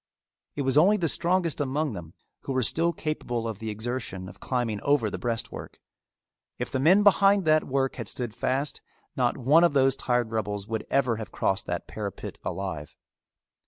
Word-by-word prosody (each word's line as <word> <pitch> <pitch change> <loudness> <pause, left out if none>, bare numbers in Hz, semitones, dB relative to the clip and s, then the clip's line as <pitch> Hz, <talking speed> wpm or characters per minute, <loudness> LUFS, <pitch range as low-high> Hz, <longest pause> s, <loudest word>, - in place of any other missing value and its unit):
It 145 - -1
was 135 +2 +4
only 200 +6 +5
the 170 -4 0
strongest 170 -1 0
among 145 0 -1
them 85 -3 -9 0.2
who 135 - -5
were 130 -1 +1
still 165 +9 +3
capable 125 -8 -3
of 110 -3 -5
the 110 - -4
exertion 110 -4 -4
of - - -12
climbing 120 -5 -2
over 140 -7 +2
the - - -4
breastwork. 115 -2 -4 0.8
If - - -4
the 130 - -1
men 180 +9 +5
behind 200 -1 +5
that 155 0 +4
work 135 0 -1
had 115 -4 -5
stood 120 +2 -3
fast, 130 +4 -2 0.3
not 125 -2 +1
one 145 +6 +5
of 170 - +4
those 135 -1 +4
tired 120 -4 0
rebels 105 -2 -3
would 110 -1 -4
ever 125 -5 +2
have 110 - -7
crossed 95 - -1
that - - -3
parapet - - -6
alive. 85 -7 -5
130 Hz, 180 wpm, -27 LUFS, 110-155 Hz, 0.8 s, only